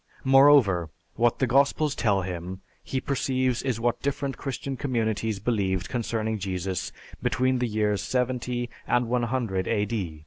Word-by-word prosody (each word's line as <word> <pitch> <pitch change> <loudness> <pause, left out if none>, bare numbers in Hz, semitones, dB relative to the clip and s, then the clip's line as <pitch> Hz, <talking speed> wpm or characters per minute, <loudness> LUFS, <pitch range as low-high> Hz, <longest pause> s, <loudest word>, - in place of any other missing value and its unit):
Moreover, 135 - +5 0.2
what 120 0 +2
the 130 - +2
Gospels 140 +3 +2
tell 100 -7 +1
him, 90 +1 -5 0.2
he 130 - -2
perceives 130 -2 0
is 125 -4 -2
what 120 0 0
different 140 -1 -2
Christian 135 0 -4
communities 110 -5 -1
believed 95 -4 -1
concerning 110 -2 -2
Jesus 95 -1 -3 0.3
between 130 0 +1
the 125 - 0
years 105 -2 0
70 125 -1 -1 0.2
and 125 -1 +2
100 120 -5 -1
A. 105 -7 -1
120 Hz, 135 wpm, -26 LUFS, 100-130 Hz, 0.3 s, Moreover